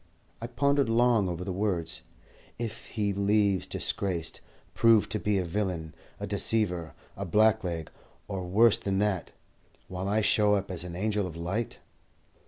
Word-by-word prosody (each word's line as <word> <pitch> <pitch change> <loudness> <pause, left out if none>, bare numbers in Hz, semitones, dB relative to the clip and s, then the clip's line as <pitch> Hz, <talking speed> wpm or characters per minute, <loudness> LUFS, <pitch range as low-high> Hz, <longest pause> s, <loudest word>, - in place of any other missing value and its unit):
I 115 - -3
pondered 140 0 +1
long 115 -4 +3
over 85 0 -4
the 95 0 -3
words, 90 -4 -1 0.6
"If 115 -2 -5
he 105 -3 -1
leaves 100 -1 +2
disgraced, 85 -5 -2 0.3
proved 115 -2 +4
to 110 - -1
be 105 -1 +1
a 95 - 0
villain, 85 -4 -2 0.3
a - - -3
deceiver, 90 -8 0 0.2
a 100 - -4
blackleg, 95 -4 +2 0.4
or 95 -2 -4
worse 110 +4 +5
than 95 -1 -1
that, 100 -4 0 0.6
while 95 +1 -4
I 105 +2 +2
show 105 0 +4
up 100 -1 -2
as 85 -2 -4
an 90 -1 -7
angel 105 0 0
of 85 - -8
light?" 95 +8 -3
100 Hz, 155 wpm, -28 LUFS, 90-110 Hz, 0.6 s, worse